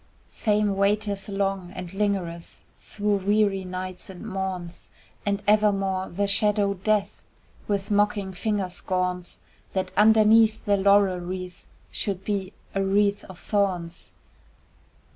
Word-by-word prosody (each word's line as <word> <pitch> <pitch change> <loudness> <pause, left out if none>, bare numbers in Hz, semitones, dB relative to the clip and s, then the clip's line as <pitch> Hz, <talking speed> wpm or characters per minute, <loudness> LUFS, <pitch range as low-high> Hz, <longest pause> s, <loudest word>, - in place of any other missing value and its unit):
Fame 210 -2 +1
waiteth 200 0 0
long, 195 -2 -2
and 180 0 -7
lingereth 195 -5 -2 0.2
Through 205 -1 -1
weary 200 0 +1
nights 185 0 -6
and 190 +3 -9
morns 190 -3 -5 0.4
And 200 0 0
evermore 195 -3 +2
the 200 +4 -1
shadow 200 0 +2
Death 205 +2 -1 0.5
With 200 0 -2
mocking 205 -1 +1
finger 205 0 -1
scorns 180 0 -3 0.3
That 185 -1 -1
underneath 220 +1 +5
the 205 - +3
laurel 200 -1 +4
wreath 180 0 -7 0.2
Should 195 -1 -3
be 200 -3 -2 0.2
a 195 - 0
wreath 200 +1 +2
of 190 - -11
thorns. 180 -5 -1
195 Hz, 120 wpm, -25 LUFS, 185-205 Hz, 0.5 s, underneath